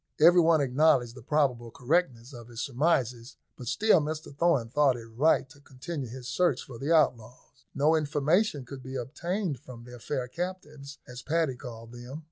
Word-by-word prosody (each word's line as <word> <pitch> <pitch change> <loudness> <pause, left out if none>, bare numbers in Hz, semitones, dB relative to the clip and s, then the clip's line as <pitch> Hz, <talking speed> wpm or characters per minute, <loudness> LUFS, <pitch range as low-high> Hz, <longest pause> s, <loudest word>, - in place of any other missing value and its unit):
Every 175 +2 +7
one 160 -2 +4
acknowledged 135 -2 +3
the 130 - -12
probable 125 -3 0
correctness 130 -1 -1
of 120 -2 -10
his 120 -2 -10
surmises, 130 -3 -1 0.2
but 125 - -10
still 215 - +4
Mr 150 -1 -5
Thorn 150 -7 +2
thought 135 -1 +3
it 115 - -9
right 130 +6 +2
to 145 +1 -17
continue 140 0 -7
his 125 +1 -8
search 175 -6 +1
for 120 -3 -11
the 145 +4 -2
outlaws. 130 -4 0
No 150 +3 +3
information 150 +1 +1
could 130 +1 -9
be 130 +1 -8
obtained 160 - -3
from 120 -1 -12
their 125 0 -11
fair 130 +1 -3
captives, 150 -3 -6
as 125 0 -9
Paddy 160 -3 0
called 115 -2 -10
them. 120 +4 -9
135 Hz, 175 wpm, -28 LUFS, 125-155 Hz, 0.2 s, Every